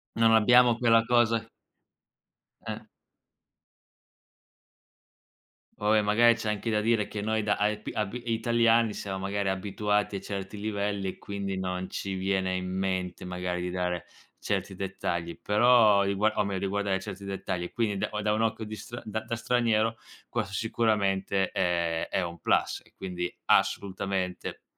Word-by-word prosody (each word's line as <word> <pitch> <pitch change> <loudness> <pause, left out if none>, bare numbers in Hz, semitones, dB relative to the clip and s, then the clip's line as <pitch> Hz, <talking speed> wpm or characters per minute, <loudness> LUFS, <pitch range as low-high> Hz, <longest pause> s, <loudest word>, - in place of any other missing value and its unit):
Non 115 0 +4
abbiamo 120 +2 +6
quella 115 -2 +4
cosa 115 -1 +3 1.2
Eh. - - -4 3.0
Poi 105 +1 +3
magari 115 +3 +5
c'è 110 -1 -3
anche 105 +2 -2
da 105 -1 +2
dire 110 -1 +2
che 105 - -5
noi 110 +1 0
da 105 -1 +2
aepi 105 +1 -1
abi 110 +3 -3
italiani 115 -1 +3
siamo 95 -1 -4
magari 100 +1 -1
abituati 105 +1 -1
a - - -5
certi 100 +1 -6
livelli, 100 -2 -2
e - - -7
quindi 100 -1 -4
non 90 0 -3
ci 95 0 -4
viene 95 0 0
in 90 0 -3
mente 95 -1 -2
magari 90 0 -3
di 90 0 -3
dare 90 -1 -2 0.3
certi 100 -1 -2
dettagli, 85 -3 -3
però 110 -1 +5
rigua 100 +2 +1
o - - +2
meglio 100 -2 -2
riguardare 100 -1 0
certi 100 0 -8
dettagli, 90 -2 -4
quindi 110 -4 -1
da - - -1
o 105 0 -3
da 105 0 +1
un 110 - 0
occhio 110 0 0
di 110 - -6
stra 120 +4 -8
da 110 0 -3
da 115 +1 -4
straniero 115 -2 +1 0.3
questo 110 -4 -2
sicuramente 100 -3 +1
è 85 -2 0
è - - 0
un 85 -1 -6
plus - - +1
e - - -25
quindi 90 -2 -4
assolutamente 95 -2 0
100 Hz, 150 wpm, -28 LUFS, 95-110 Hz, 3.0 s, abbiamo